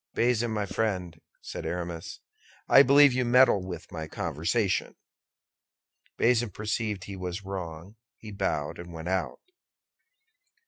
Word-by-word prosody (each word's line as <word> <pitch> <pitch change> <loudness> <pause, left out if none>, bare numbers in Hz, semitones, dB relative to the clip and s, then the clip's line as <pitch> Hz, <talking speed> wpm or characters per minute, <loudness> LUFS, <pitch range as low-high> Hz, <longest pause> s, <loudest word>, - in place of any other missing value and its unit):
"Bazin, 120 -1 +2
my 105 -2 -1
friend," 90 -7 -2 0.2
said - - -6
Aramis, 85 -1 -5 0.5
"I 135 - +8
believe 140 0 +6
you 130 0 +1
meddle 120 -4 +5
with 90 -1 -8
my 80 -2 -5
conversation." - - -1 1.2
Bazin 120 -1 +3
perceived 105 0 -3
he 100 0 -7
was 90 +1 -5
wrong; 95 +1 -7 0.2
he 110 - -10
bowed 95 -8 -2
and 85 0 -9
went 80 +1 -6
out. 95 -1 -2
100 Hz, 125 wpm, -28 LUFS, 85-115 Hz, 1.2 s, I